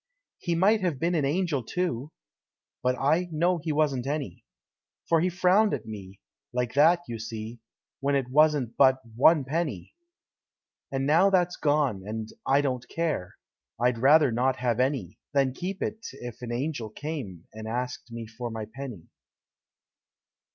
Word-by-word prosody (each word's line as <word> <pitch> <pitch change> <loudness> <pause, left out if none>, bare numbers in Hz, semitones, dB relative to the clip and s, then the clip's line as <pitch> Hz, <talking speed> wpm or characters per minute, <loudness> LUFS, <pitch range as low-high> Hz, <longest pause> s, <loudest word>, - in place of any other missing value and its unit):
He 170 -2 -1
might 205 +5 +4
have 175 -6 0
been 170 +6 0
an 155 -5 +1
Angel, 155 -1 0
too! 150 -2 -2 0.7
But 125 0 +1
I 160 +7 +2
know 170 +3 +1
he 160 0 -3
wasn't 145 -4 +1
any. 140 - -3 0.6
For 165 -1 +3
he 180 - +2
frowned 185 +2 +3
at 115 -5 -8
me, 100 -3 -9 0.3
like 125 -2 -1
that, 165 +5 +5
you 115 -1 -5
see, 110 +1 -6 0.4
When 140 +1 +1
it 135 -3 0
wasn't 150 -4 +3
but 130 -1 +5 0.2
One 150 +4 +5
penny. 155 +2 -3 1.0
And 135 0 -1
now 165 +7 +5
that's 180 -2 +2
gone; 145 -9 +1
and 110 +2 -5 0.2
I 140 +1 +4
don't 125 -3 -2
care. 160 - -2 0.4
I'd 120 -1 +2
rather 145 +2 +6
not 125 +3 +1
have 125 -2 -1
any, 130 - -1
Than 135 -2 +2
keep 185 +6 -4
it, 220 +1 -3
if 120 -3 -9
an 120 -1 -5
Angel 120 -2 -2
came 115 - -6
And 110 0 -7
asked 125 +1 -4
me 115 -1 -6
for 115 +2 -6
my 110 -1 -5
penny. 130 -11 -7
135 Hz, 160 wpm, -27 LUFS, 120-160 Hz, 1.0 s, rather